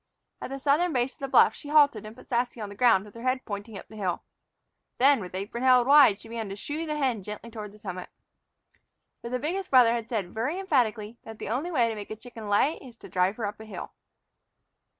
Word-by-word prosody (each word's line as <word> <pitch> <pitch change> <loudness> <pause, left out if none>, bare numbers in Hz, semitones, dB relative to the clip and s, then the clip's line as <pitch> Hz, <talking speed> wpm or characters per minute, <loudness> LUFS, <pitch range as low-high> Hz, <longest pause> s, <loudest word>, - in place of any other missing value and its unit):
At - - -5
the 270 - -5
southern 300 +5 +2
base 250 +1 0
of - - -31
the 275 - -3
bluff 255 -4 +5
she 290 - -12
halted 285 -8 +4
and 215 - -11
put - - -15
Sassy 240 0 -1
on 210 -2 -5
the 200 - -10
ground 225 -4 +4
with 210 - -14
her 230 - -10
head 255 +1 -1
pointing 205 +1 -6
up - - -11
the 220 - -14
hill. 185 -4 -2 0.7
Then, 275 +1 +5
with 185 -2 -8
apron 205 +6 -4
held 255 -2 +5
wide, 275 -7 +6
she 225 - -13
began 225 -2 -5
to 195 - -5
shoo 300 +9 -5
the 300 -1 -2
hen 255 -7 0
gently 210 +4 -8
toward 210 -2 -7
the 210 - -16
summit. 185 -3 -7 1.1
For 235 - -6
the 250 - -1
biggest 355 +8 -3
brother 245 -3 +6
had 230 -1 -4
said 200 -7 -3
very 255 +10 -2
emphatically 235 - 0
that 225 -1 -10
the - - -6
only 270 +10 -2
way 250 -9 +2
to 225 - -2
make 210 -2 -8
a 215 - -5
chicken 225 -1 -10
lay 260 +10 +2
is 245 -4 -13
to - - -13
drive 185 +2 +1
her 225 - -2
up 205 +1 -5
a 220 - -10
hill. 215 - -8
235 Hz, 245 wpm, -27 LUFS, 210-265 Hz, 1.1 s, wide